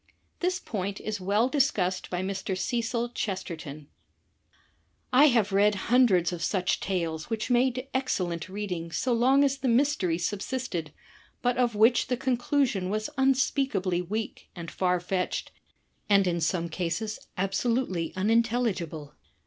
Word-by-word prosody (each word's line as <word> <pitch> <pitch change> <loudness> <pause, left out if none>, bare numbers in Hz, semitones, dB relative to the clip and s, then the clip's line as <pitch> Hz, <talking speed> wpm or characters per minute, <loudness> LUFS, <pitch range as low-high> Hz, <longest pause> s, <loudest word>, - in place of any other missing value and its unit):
This 365 +1 0
point 200 -2 -4
is 215 -2 -4
well 205 +6 +2
discussed 255 -10 0
by 180 0 -2
Mr. 190 0 -3
Cecil 235 +2 -1
Chesterton: 165 -9 -5 1.3
"I 270 +4 +7
have 230 -8 +3
read 205 +1 +4 0.2
hundreds 190 -9 +4
of 170 - -5
such 185 +1 0
tales 165 -3 -2
which 225 +1 -2
made 255 +1 +2
excellent 185 -11 -1
reading 185 -4 -4
so 250 +8 0
long 260 +4 +4
as 275 -1 +1
the 270 - -1
mystery 235 - +2
subsisted, 195 - -3 0.5
but 245 0 +2
of 240 -3 +2
which 225 +4 +4
the 250 - 0
conclusion 245 -5 0
was 215 +5 -2
imspeakably 265 -8 +1
weak 215 +5 -5
and 170 -2 -7
far 180 -1 +1
fetched 180 +1 -2 0.6
and 200 -1 +5
in 170 -2 0
some 170 +2 0
cases 175 +6 -3 0.2
absolutely 195 -2 0
unintelligible. 200 -8 0
205 Hz, 135 wpm, -27 LUFS, 180-245 Hz, 1.3 s, I